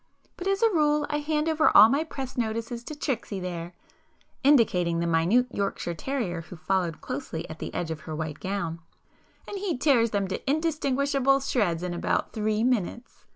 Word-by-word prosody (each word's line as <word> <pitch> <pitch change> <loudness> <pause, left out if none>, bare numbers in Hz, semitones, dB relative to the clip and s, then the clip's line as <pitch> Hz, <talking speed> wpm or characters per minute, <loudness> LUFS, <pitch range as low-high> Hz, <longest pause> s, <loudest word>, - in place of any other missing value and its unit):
But 360 - -5
as 390 +3 +1
a 455 - +5
rule 300 -2 +3
I 295 - 0
hand 300 +1 -1
over 320 0 +4
all 215 - +11
my 280 +6 +1
press 270 -5 -6
notices 230 0 -3
to 305 - -6
Tricksy 240 -9 -3
there,"—indicating 180 - -1
the 170 - 0
minute 170 +9 +3
Yorkshire 195 -4 -2
terrier 190 - -3
who 175 - -11
followed 170 0 -1
closely 160 +4 -5
at 160 - -9
the - - -5
edge 165 -2 -3
of 160 - -4
her 155 - -3
white 155 -1 -4
gown,—"and 185 - -7
he 380 -7 -1
tears 250 -5 +3
them 200 -2 -1
to 195 - -4
indistinguishable 280 -3 +2
shreds 205 -11 0
in 180 -1 -2
about 175 - -1
three 215 0 0
minutes!" 240 -1 -2
230 Hz, 170 wpm, -27 LUFS, 175-280 Hz, -, all